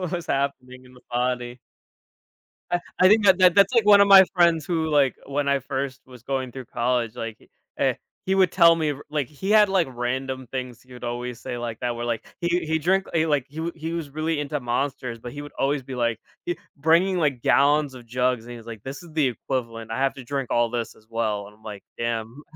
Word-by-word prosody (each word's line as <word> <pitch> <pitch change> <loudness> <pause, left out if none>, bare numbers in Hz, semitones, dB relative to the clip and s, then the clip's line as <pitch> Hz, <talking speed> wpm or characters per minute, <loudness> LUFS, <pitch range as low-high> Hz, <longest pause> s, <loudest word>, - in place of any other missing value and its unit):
What 180 -3 -3
was 175 -2 -3
happening 130 -2 -2
in 125 - -17
the 125 - -17
body. 125 0 -1 1.1
Uh, 175 - +2 0.2
I 185 - +7
think 210 +2 +5
that 190 -2 +6
that 180 -2 +6
that's 200 +3 +5
like 230 -4 +4
one 205 -1 +8
of 200 - +5
my 195 -1 +10
friends 170 -3 +4
who, 160 -2 -1
like, 140 -4 +3
when 140 +1 -2
I 140 0 +2
first 135 0 -4
was 125 -2 -15
going 130 -1 -2
through 130 0 -8
college, 120 -1 -1
like, 115 -2 -5 0.4
eh, - - +2 0.3
he 190 - +1
would 190 -2 +4
tell 170 -2 +6
me 155 -2 0
r 145 0 -7
like, 150 -4 -1
he 155 +8 -6
had, 210 -1 +6
like, 190 -5 +2
random 130 +1 -3
things 125 -3 -5
he 125 0 -16
would 125 - -11
always 120 0 -4
say 125 -2 -5
like 120 -2 -5
that 120 -1 -2
were, 120 0 -4
like, 115 -1 -3
he 175 0 0
he 160 0 +1
drink 190 +5 +1
he, 160 -1 +2
like, 145 -5 +1
he 160 +3 -4
he 160 +1 -5
was 165 -4 -4
really 155 +2 -2
into 145 0 -2
Monsters, 125 -1 -2
but 120 +1 -8
he 145 - -6
would 145 0 -10
always 140 0 +1
be, 130 0 -7
like, 115 -2 0 0.3
he 175 - -2 0.2
bringing, 170 +6 +3
like, 145 -7 0
gallons 145 +1 +3
of 125 -2 -12
jugs. 125 0 0
And 120 - -9
he 120 - -7
was 115 0 -14
like, 110 -3 -8
"This 135 +1 -7
is 170 - -13
the 155 -3 +2
equivalent. 115 -2 -4
I 115 - -2
have 135 0 +1
to 135 - -9
drink 135 0 -3
all 120 0 +2
this 120 -1 -4
as 110 - -23
well." 110 -3 -2
And 105 - -16
I'm 110 - -27
like, 105 -2 -8
"Damn." 115 +3 -3
135 Hz, 240 wpm, -24 LUFS, 120-160 Hz, 1.1 s, my